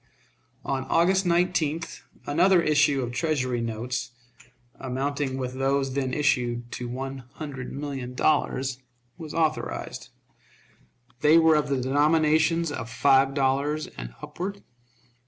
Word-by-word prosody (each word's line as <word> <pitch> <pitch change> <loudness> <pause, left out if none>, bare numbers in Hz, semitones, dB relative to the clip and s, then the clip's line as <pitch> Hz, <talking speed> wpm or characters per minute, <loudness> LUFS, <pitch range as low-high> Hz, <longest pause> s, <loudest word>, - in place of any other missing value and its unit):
On 135 -1 -2
August 185 +3 +3
19th 170 -2 0 0.2
another 180 +5 +4
issue 145 -4 +3
of 120 - -4
Treasury 130 -4 -1
notes, 115 +2 -3 0.7
amounting 135 +1 -2
with 130 -1 -3
those 135 0 0
then 135 -1 -1
issued 120 -4 0
to 120 -1 -5
one 135 +2 -5
hundred 140 -5 -7
million 135 -3 -5
dollars, 135 -3 +1 0.4
was 155 -3 -7
authorized. 160 -1 -2 1.1
They 150 +2 +6
were 160 -1 +6
of 150 -1 +2
the 140 -2 0
denominations 155 +4 +2
of 115 -5 -5
five 135 +2 +3
dollars 140 +3 +1
and - - -8
upward. 200 +3 -5
140 Hz, 120 wpm, -26 LUFS, 130-155 Hz, 1.1 s, They